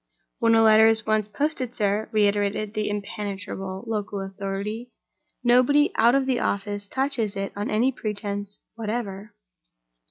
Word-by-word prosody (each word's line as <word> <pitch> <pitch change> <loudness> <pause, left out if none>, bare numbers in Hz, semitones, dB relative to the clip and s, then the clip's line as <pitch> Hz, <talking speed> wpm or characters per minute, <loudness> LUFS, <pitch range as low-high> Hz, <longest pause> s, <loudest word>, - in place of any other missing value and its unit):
"When 230 -1 +4
a 225 - +5
letter 220 0 +7
is 225 -1 +2
once 215 -1 +1
posted, 255 +1 -2
sir," 205 0 0
reiterated 205 0 +1
the 215 -1 -1
impenetrable 200 -2 -5
local 210 -3 -3
authority, 195 +4 -5 0.5
"nobody 255 +5 +4
out 235 +3 +5
of 275 -1 +2
the 260 -2 +1
office 205 0 -2
touches 260 -5 -1
it 195 0 -4
on 205 +1 -3
any 235 +5 +2
pretense 205 -3 -5 0.2
whatever." 215 -2 -5
215 Hz, 135 wpm, -25 LUFS, 200-230 Hz, 0.5 s, letter